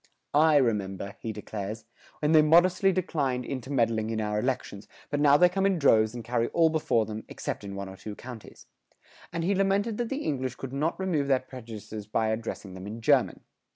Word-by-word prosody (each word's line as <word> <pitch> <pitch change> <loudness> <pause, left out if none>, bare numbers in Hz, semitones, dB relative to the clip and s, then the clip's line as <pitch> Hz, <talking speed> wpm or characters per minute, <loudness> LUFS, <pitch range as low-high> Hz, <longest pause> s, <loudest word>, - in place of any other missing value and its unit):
[109:4] 145 - +5
"I 160 -1 +5
remember," 100 -5 -1
he 115 - -4
declares, 105 +1 -6 0.4
"when 150 - +3
they 155 -1 +7
modestly 180 +5 +5
declined 145 -9 -1
intermeddling 120 -5 -1
in 110 -1 -2
our 105 -1 -1
elections, 115 -4 -3 0.2
but 145 - 0
now 145 -1 +6
they 180 - +6
come 190 +2 -1
in 195 -2 +1
droves 110 -6 +4
and 120 - -6
carry 120 0 0
all 165 -1 +3
before 135 -8 +1
them, 110 +1 -6
except - - -5
in 100 -1 -6
one 100 0 -5
or 95 - -9
two 105 +1 -7
counties;" 120 -2 -11 0.7
and 170 0 -3
he 190 +4 +2
lamented 200 +3 +1
that 240 -1 -1
the 275 +2 -3
English 130 -4 -2
could 135 0 -7
not 150 +6 -1
remove 165 -7 0
their 135 -2 +3
prejudices 110 -5 -9
by 110 +1 0
addressing 110 -3 -4
them 95 +1 -8
in 110 +3 -6
German. 115 - +2
125 Hz, 200 wpm, -28 LUFS, 110-160 Hz, 0.7 s, they